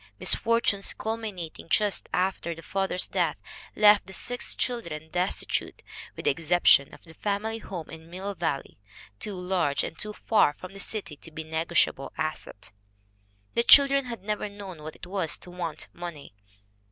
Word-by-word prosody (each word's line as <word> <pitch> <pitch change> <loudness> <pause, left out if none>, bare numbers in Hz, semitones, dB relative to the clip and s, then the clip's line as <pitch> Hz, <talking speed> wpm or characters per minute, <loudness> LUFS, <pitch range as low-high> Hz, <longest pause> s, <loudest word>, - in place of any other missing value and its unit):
Misfortunes 230 -4 +2
culminating 210 -8 -5
just 210 +1 +2
after 180 -2 0
the 165 - -11
father's 190 -1 0
death - - 0 0.4
left 210 -1 +6
the 190 - -9
six 245 +5 -2
children 165 -11 -3
"destitute, 180 +1 -1 0.3
with - - -8
the - - +5
excep 165 +4 0
tion 140 - +7
of - - -14
the 160 - -14
family 210 +5 -2
home 180 -7 -6
in 160 0 -11
Mill 190 +3 -4
Valley, 160 - -3 0.4
too 205 - -4
large 180 -5 +1
and - - -4
too 210 0 -3
far 210 -9 +3
from 185 +4 -10
the 195 - -10
city 200 -6 -2
to 165 - -12
be 160 0 -6
a - - -17
negotiable 160 -3 +1
asset." 155 -11 -4 0.8
The - - +3
children 275 +2 +7
had 235 -6 -6
never 210 0 -2
known 195 -5 -9
what 155 +1 -7
it - - -10
was 180 -3 -2
to 180 - -12
want 170 -3 -4
money. 170 - -8
180 Hz, 165 wpm, -27 LUFS, 160-210 Hz, 0.8 s, tion